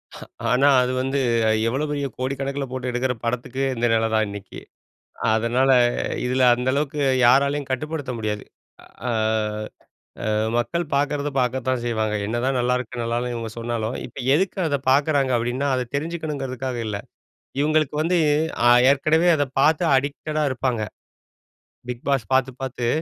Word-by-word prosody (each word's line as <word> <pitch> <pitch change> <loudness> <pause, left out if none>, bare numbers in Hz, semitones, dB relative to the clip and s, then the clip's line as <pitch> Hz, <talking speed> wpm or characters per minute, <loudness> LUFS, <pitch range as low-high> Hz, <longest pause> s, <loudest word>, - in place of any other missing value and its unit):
ஹா, - - -10 0.2
ஆனா 135 +3 +4
அது 125 - 0
வந்து 135 +2 -1 0.5
எவ்வளோ 135 +6 0
பெரிய 145 -1 -1
கோடிக்கணக்கில 135 +2 -2
போட்டு 130 -1 -3
எடுக்கிற 125 +1 0
படத்துக்கு, 125 +3 -2
இந்த 120 0 0
நில 115 0 +2
தான் 110 0 +3
இன்னைக்கு. 100 -1 -8 0.8
அதனால 120 +4 +2 0.6
இதுல 130 +1 +1
அந்த 125 +1 -2
அளவுக்கு 145 0 -1 0.3
யாராலயும் 140 +3 +3
கட்டுப்படுத்த 145 0 -3
முடியாது. 105 -1 -3 0.6
அ - - 0 1.2
அ - - +1 0.3
மக்கள் 170 +9 -1
பார்க்குறத 145 +1 0
பார்க்கத்தான் 125 0 -1
செய்வாங்க. 110 -2 -1
என்னதான் 125 +4 0
நல்லாயிருக்கு, 125 -1 -1
நல்லா 115 0 -1
இல்லன்னு 120 0 -3
இவங்க 115 -1 -5
சொன்னாலும் 115 0 -3
"இப்ப 125 - -12 0.2
எதுக்கு 190 +4 0
அத 145 - +1
பார்க்குறாங்க?" 140 -1 +2
அப்படீன்னா, 120 +4 -1
அத 125 - 0
தெரிஞ்சுக்கணுங்கிறதுக்காக 140 -5 -3
இல்ல. 105 -2 -3 0.6
இவங்களுக்கு 155 -1 +1
வந்து 175 +2 +2 0.5
அ - - +7 0.2
ஏற்கனவே 155 +5 +3
அத 145 -2 +1
பார்த்து 160 +4 +3
அடிக்டடா 150 +3 -1
இருப்பாங்க. 125 -3 -1 1.1
'பிக் 125 -1 -5
பாஸ்' 135 -5 0
பார்த்து 130 0 +2
பார்த்து 125 -2 -3
130 Hz, 140 wpm, -23 LUFS, 120-145 Hz, 1.2 s, அ